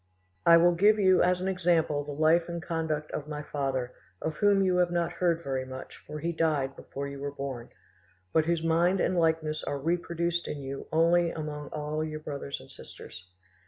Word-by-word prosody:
"I 170 - +9
will 175 +1 +5
give 205 +5 +4
you 185 -3 +4
as 180 0 +2
an 185 - -1
example 170 -5 +1
the 145 - -7
life 160 +4 +3
and 170 0 -3
conduct 160 -3 -3
of 145 - -4
my 150 -1 -5
father, 135 -4 -2 0.3
of 160 -1 -3
whom 200 -1 +4
you 185 -1 +2
have 180 -1 +3
not 170 -1 0
heard 170 -2 0
very 135 -1 -2
much, 130 0 -9
for 150 - -6
he 165 +3 -2
died 150 -5 0
before 140 +1 -6
you 140 0 -7
were 145 +1 -3
born, 135 -4 -6 0.6
but 160 -1 +3
whose 170 -1 0
mind 170 +3 +3
and 185 - +1
likeness 160 -2 +1
are 145 - -2
reproduced 170 +2 -1
in 145 -2 -5
you 135 +1 -6
only 170 +2 +4
among 150 -2 -5
all 150 +1 -3
your 155 -1 -4
brothers 140 -2 -5
and 65 - -14
sisters. 90 +1 -11
160 Hz, 195 wpm, -28 LUFS, 145-170 Hz, 0.6 s, I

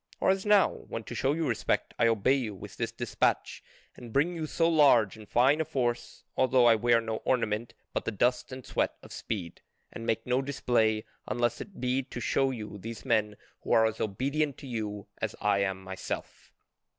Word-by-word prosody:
Or - - +4
as 195 +2 -1
now, 205 -2 +6
when 115 - -7
to - - -8
show 135 +2 +1
you 160 0 -1
respect 115 - -1
I 115 - +5
obey 115 +3 +3
you 120 -7 -1
with 95 - -10
this - - -2
despatch - - -1 0.3
and 120 -2 -10
bring 155 +8 +2
you 160 -2 -3
so 165 +2 +1
large 140 - +5
and 110 -2 -13
fine 135 +6 +4
a - - +2
force, 120 -5 -2
although 130 -1 +4
I 120 - +8
wear 115 +1 +3
no 110 -1 -3
ornament 115 -2 -1 0.2
but - - -2
the - - -1
dust 125 +5 +1
and 130 -1 -8
sweat - - 0
of - - -11
speed, 90 -6 -5 0.3
and 115 - -7
make 115 -1 -1
no 125 +1 +1
display 120 -6 +1 0.2
unless 120 -1 0
it 195 - -10
be 125 +1 +1
to 130 -2 -8
show 135 +3 +1
you 105 -5 -6
these 115 +5 -8
men 110 -4 +1 0.2
who - - -1
are 110 - +6
as 110 0 -2
obedient 140 +7 -1
to 140 - -10
you 105 -4 -4 0.2
as - - -2
I 100 -1 +2
am 95 -1 -1
myself." 95 0 -6
120 Hz, 200 wpm, -29 LUFS, 110-135 Hz, 0.3 s, I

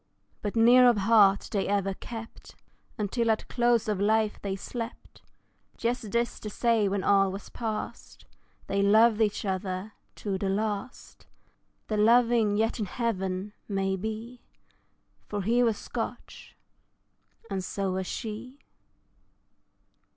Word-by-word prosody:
But 205 +1 -3
near 245 +2 +7
of 235 - +2
heart 200 -1 +4
they 200 -2 0
ever 195 -1 0
kept, 225 +3 -10 0.4
Until 230 +2 0
at 220 - 0
close 240 -2 +2
of 210 -3 -1
life 215 +1 +1
they 195 -1 -3
slept, 230 +4 -7 0.6
Just 235 -2 -2
this 235 +2 -1
to 210 - -6
say 225 -1 +2
when 195 -1 -1
all 195 -1 +4
was 195 +1 -8
past 220 -3 -6 0.4
They 200 0 0
loved 220 +2 +5
each 210 -1 0
other 190 +1 -3 0.2
to 195 -3 -3
the 195 - -1
last, 210 +4 -4 0.6
They're 215 -1 -1
loving 230 -1 +4
yet 225 +2 0
in 210 - -2
heaven, 190 -3 -2
maybe 215 +5 -3 0.9
For 205 -1 -3
he 235 +5 +2
was 230 -4 +2
Scotch, - - -7 0.9
and 190 -1 -2
so 195 +1 -2
was 185 0 -2
she. 230 +5 -6
215 Hz, 130 wpm, -28 LUFS, 195-230 Hz, 0.9 s, near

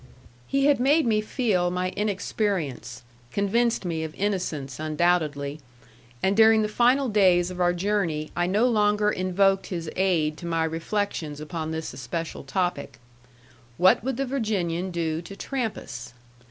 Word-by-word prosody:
He 275 0 +1
had 290 -2 +4
made 290 +5 +3
me 215 -2 +2
feel 215 -6 0
my 180 +1 -2
inexperience, 190 - -2 0.3
convinced 225 +2 +1
me 165 -2 -2
of 160 -1 -6
innocence, 160 -10 -2
undoubtedly; 155 -2 0 0.6
and 190 +1 +2
during 220 0 +6
the - - 0
final 245 +5 +3
days 185 -5 +3
of 180 0 -5
our 175 0 +4
journey 175 -5 -1
I 175 0 +1
no 205 +6 +2
longer 210 -2 +2
invoked 195 +1 +1
his 165 -4 -4
aid 165 -5 +1
to 170 - -7
my 165 -1 0
reflections 165 -2 -2
upon 155 +1 -5
this 160 0 -4
especial 160 +6 -5
topic: 175 +6 -2 0.8
What 185 +3 +5
would 260 -1 -2
the 275 - 0
Virginian 195 -9 -1
do 165 -2 -2
to 175 +4 -10
Trampas? 205 - -5
185 Hz, 145 wpm, -25 LUFS, 160-210 Hz, 0.8 s, during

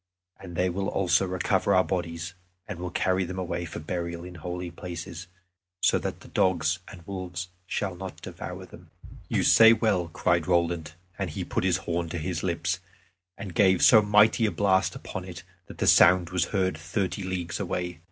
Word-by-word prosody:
And 90 -3 -9
they 90 +2 +2
will 95 +2 -2
also 95 0 +2
recover 90 -1 +1
our 95 - +5
bodies, 85 -1 -3 0.3
and 105 -5 -6
will 90 0 -4
carry 95 +1 +1
them 95 +1 -5
away 85 -1 -3
for - - -7
burial 85 +1 -4
in 90 0 -9
holy 90 +1 -5
places, 85 0 -7 0.6
so - - +4
that - - -5
the - - -13
dogs 90 -2 +1
and 85 -4 -12
wolves 90 -2 -5 0.2
shall 95 -1 -2
not 95 +1 -8
devour - - -7
them." - - -15 0.4
"You - - +1
say 115 0 +8
well," 105 -6 +1
cried 85 0 0
Roland, 85 -3 0 0.3
and 95 -3 -1
he 75 - -4
put - - -2
his 90 -1 +2
horn 85 -1 -2
to 85 - -4
his 85 +1 -3
lips, 85 0 -1 0.6
and 100 -3 -7
gave 95 -1 +4
so 110 -3 +8
mighty 105 +2 +4
a - - -1
blast 95 -2 +2
upon - - -6
it, - - -9 0.2
that - - -11
the - - -1
sound 90 -1 +6
was 90 -1 +1
heard 95 -5 -1
thirty 95 +4 -2
leagues 90 -2 -3
away. 90 -2 -3
90 Hz, 185 wpm, -27 LUFS, 85-95 Hz, 0.6 s, say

